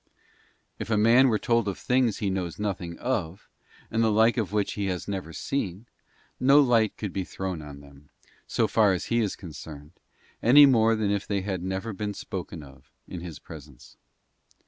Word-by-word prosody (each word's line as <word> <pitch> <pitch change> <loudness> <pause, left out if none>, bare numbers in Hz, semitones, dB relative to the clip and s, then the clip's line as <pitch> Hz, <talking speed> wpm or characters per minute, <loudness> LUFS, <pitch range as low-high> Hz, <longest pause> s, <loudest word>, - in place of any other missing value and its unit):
If - - -5
a 110 - +2
man 115 +5 +5
were 110 -4 +2
told 115 -1 +1
of 100 - -2
things 125 -4 +1
he 100 -2 -1
knows 90 -3 -3
nothing 90 -5 -4
of, 95 -9 -3 0.4
and 115 +1 +1
the 110 - +3
like 110 +2 +4
of 110 -7 -2
which 105 -1 0
he 100 -1 -2
has 90 -2 -3
never 95 -5 -4
seen, 100 0 -4 0.5
no 135 +3 +6
light 115 -6 +3
could 105 -4 -5
be 95 - -2
thrown 95 -2 -5
on 70 -1 -10
them, 70 +1 -17 0.4
so - - +1
far 105 -4 +3
as 90 - -3
he 120 - +3
is 105 -4 -1
concerned, 75 -3 -10 0.5
any 145 +5 +8
more 115 -4 +4
than 105 -2 0
if 100 -1 -2
they 100 -2 -1
had 95 -2 -3
never 95 +4 -4
been 105 +1 -4
spoken 80 - -6
of 70 -1 -17 0.2
in 90 - -7
his 85 -4 -8
presence. 75 -6 -13
100 Hz, 190 wpm, -26 LUFS, 85-115 Hz, 0.5 s, any